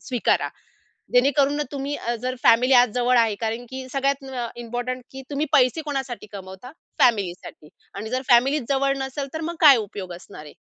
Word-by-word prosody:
स्वीकारा. 245 -3 +1 0.7
जेणेकरून 275 +3 +3
ना 295 - -1
तुम्ही 280 +1 -3
अ, 235 +1 -3
जर 255 0 -2
फॅमिली 250 +3 +5
आज 245 -1 +6
जवळ 250 0 +3
आहे 225 -3 +3
कारण 230 +2 -3
की 260 0 -7
सगळ्यात 275 0 0
म 265 0 -9
अ, 240 -2 -3
इम्पोर्टंट 245 +2 -4
की 265 0 -8
तुम्ही 290 +2 -1
पैसे 265 +3 +4
कोणासाठी 265 -6 -4
कमवता? 190 +5 -10 0.3
फॅमिलीसाठी 190 -9 0 0.2
आणि 215 +3 -6
जर 255 +1 -1
फॅमिलीचं 255 +2 +4
जवळ 275 0 +1
नसेल 270 +1 -4
तर 315 - -4
मग 340 - -5
काय 285 -5 +8
उपयोग 195 -4 -6
असणार 175 -2 -11
आहे? 150 - -12
250 Hz, 185 wpm, -23 LUFS, 230-275 Hz, 0.7 s, काय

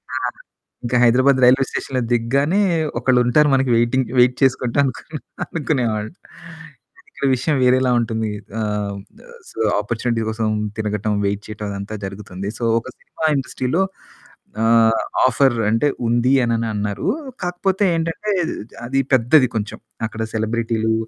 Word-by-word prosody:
ఆ! - - -1 0.6
ఇంకా 120 +1 -1
హైదరాబాద్ 130 +3 +4
రైల్వే 130 +2 +5
స్టేషన్‌లో 130 -2 -3
దిగగానే 140 - +1 0.4
ఒకళ్ళుంటారు 130 +3 +3
మనకి 135 -1 +1
వేయిటింగ్ 120 +2 +1
వేయిట్ 125 0 +5
చేసుకుంటా 130 0 +1
అనుకుని 150 +4 -5 0.3
అనుకునేవాన్ని. 120 -8 -2 1.0
ఇక్కడ - - -5
విషయం 145 +4 0
వేరేలా 125 0 +3
ఉంటుంది. 110 -2 -2 0.3
ఆహ్, 105 -1 -2 0.2
ద - - -16 0.3
సో - - -11 0.2
ఆపార్చునిటీస్ 115 +1 -2
కోసం 110 0 -2 0.3
తినగటం 105 -1 -1
వేయిట్ 100 +1 -2
చేయడం 105 0 -6
అదంతా 100 +2 -6
జరుగుతుంది. 95 0 -6
సో - - -5 0.2
ఒక 115 - -12
సినిమా 160 - -6
ఇండస్ట్రీలో 135 +5 -1 0.8
ఆహ్, 115 0 +4 0.2
ఆఫర్ 130 -1 +3
అంటే 115 +7 +2 0.2
ఉంది 120 +3 +2
అని 115 -1 0
అన్నారు. 105 -1 -3 0.4
కాకపోతే 190 +3 0
ఏంటంటే 165 +6 -2 0.5
అది 135 +2 0
పెద్దది 130 +2 +5
కొంచెం. 105 0 -4 0.3
అక్కడ 110 +1 -7
సెలబ్రిటీలు 110 0 0
120 Hz, 125 wpm, -20 LUFS, 110-135 Hz, 1.0 s, రైల్వే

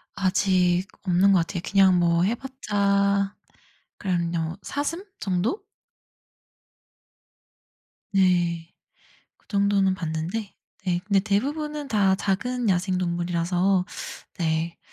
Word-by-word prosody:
아직 185 -1 +2 0.2
없는 190 +1 +4
것 185 - +5
같아요. 170 +1 -2
그냥 190 -2 +5
뭐 170 0 +3
해 220 +5 +1
봤자 200 -6 0 0.6
그냥 175 -3 -1
요 165 +2 -2
사슴 330 +7 -3
정도? 195 - -1 2.5
네. 175 -3 +2 0.7
그 - - -35
정도는 200 -2 +2
봤는데 175 +5 -4 0.3
네 175 -1 +1
근데 200 -2 +3
대부분은 290 +9 -2
다 195 -5 +3
작은 225 +4 -1
야생동물이라서 180 0 +1 0.5
네. 165 0 -1
190 Hz, 190 characters per minute, -25 LUFS, 175-205 Hz, 2.5 s, 것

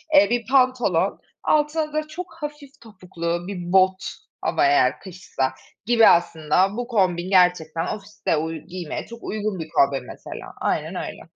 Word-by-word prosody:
Eee, 290 +1 +7
bir 240 -1 0
pantolon, 250 -9 +2 0.2
altına 305 0 +1
da 310 0 -1
çok 350 +4 -8
hafif 295 -2 -8
topuklu 175 -5 -5
bir 180 -3 -5
bot 190 0 +4 0.4
ama 355 - +1
eğer 360 +1 +3
kışsa 180 -8 -3 0.3
gibi. 230 0 +6
Aslında 170 +4 +3
bu 245 0 -3
kombin 185 -6 +1
gerçekten 180 -3 +3
ofiste 205 -4 -2
uy 160 +1 -2
giymeye 175 0 -6
çok 235 0 -11
uygun 210 -3 -3
bir 160 -1 -6
kombin 140 -4 +2
mesela, - - -9
aynen - - -1
öyle. - - -5
195 Hz, 150 wpm, -23 LUFS, 175-255 Hz, 0.4 s, Eee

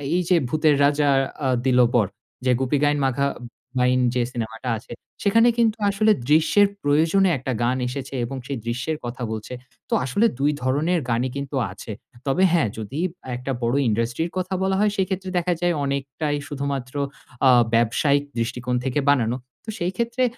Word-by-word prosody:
এই 180 - +2
যে 180 - +5
'ভূতের 155 +2 +3
রাজা 145 0 +2 0.4
আ - - +2 0.2
দিল 125 -1 +4
বর' 105 -6 +2 0.3
যে 130 - +4
'গুপি 130 +2 +1
গাইন 145 0 +3
বাঘা 135 +1 +1 0.5
বাইন' 125 0 +3
যে 125 - +2
সিনেমাটা 115 +1 -5
আছে 110 - -14 0.3
সেখানে 230 +3 +5
কিন্তু 230 -2 +2
আসলে 215 +2 +3 0.2
দৃশ্যের 160 +7 +5 0.2
প্রয়োজনে 160 +7 +3
একটা 130 +1 -4
গান 125 +2 +1
এসেছে 135 +2 -6
এবং 135 +3 -6
সেই 140 - -3
দৃশ্যের 125 +7 -2
কথা 120 +1 -5
বলছে 110 +2 -5 0.4
তো - - -2
আসলে 200 - +2
২ 145 +2 +3
ধরনের 150 +7 +1
গানই 120 +2 +1
কিন্তু 140 0 -5 0.2
আছে 100 +3 -9 0.4
তবে 135 +8 +2
হ্যাঁ, 160 -11 +3
যদি 110 +7 -5 0.4
একটা 125 +2 -4
বড়ো 120 +3 +1
ইন্ডাস্ট্রির 120 +9 -1
কথা 185 +1 -2
বলা 190 0 +1
হয় 210 0 +3
সেক্ষেত্রে 190 0 -1
দেখা 175 0 +1
যায় 175 0 +2
অনেকটাই 140 +2 -2
শুধুমাত্র 140 -3 -4 0.5
আ - - +7 0.3
ব্যবসায়িক 140 +5 +2 0.2
দৃষ্টিকোণ 125 +2 -2
থেকে 135 +2 0
বানানো 125 -3 +1 0.3
তো - - -8
সেই 175 +1 0
ক্ষেত্রে 235 +2 0
140 Hz, 170 wpm, -23 LUFS, 125-175 Hz, 0.5 s, আ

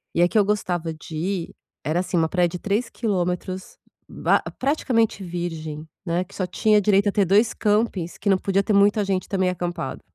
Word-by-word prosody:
E 170 - +3
a 175 - +6
que 220 - -1
eu 205 - +5
gostava 175 -5 -1
de 155 0 -10
ir, 180 +2 -3 0.3
era 160 +4 0
assim, 180 -1 -1
uma 160 -1 +2
praia 180 -2 +2
de 175 +1 -6
3 210 +4 -1
quilômetros 185 -3 -2 0.3
ba - - +2 0.2
praticamente 240 -7 +1
virgem, 160 -3 -5 0.2
né. 175 +1 0
Que 195 - -18
só 185 - -1
tinha 210 +3 +3
direito 200 0 +3
a - - 0
ter 200 0 +2
2 210 +5 +3
campings 210 -5 0
que 200 - -1
não 190 - +5
podia 195 +1 +1
ter 210 - 0
muita 205 +1 +4
gente 190 -1 -1
também 190 -2 +1
acampado. 175 -1 -4
190 Hz, 200 wpm, -23 LUFS, 175-205 Hz, 0.3 s, a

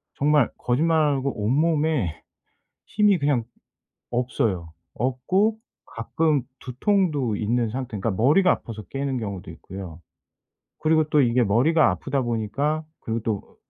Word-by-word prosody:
정말 145 -2 +3
거짓말 160 +6 +1
안 145 -2 +2
하고 135 +1 -1
온몸에 150 - +1 0.6
힘이 210 -3 +3
그냥 140 -5 +1 0.7
없어요. 110 -9 -1 0.2
없고 135 - +1 0.3
가끔 150 +5 0 0.2
두통도 140 - 0
있는 115 +2 0
상태, 125 -2 -5
그러니까 105 +4 -1
머리가 160 +10 +5
아파서 110 -8 -3
깨는 135 -1 -2
경우도 100 -5 -6
있고요. 90 -4 -9 0.8
그리고 155 0 +3
또 150 - +4
이게 120 -1 +3
머리가 130 +10 +3
아프다 140 -1 -2
보니까 120 +7 -1 0.2
그리고 115 0 -2
또 105 -3 -2
으 - - -26
130 Hz, 295 characters per minute, -24 LUFS, 115-155 Hz, 0.8 s, 머리가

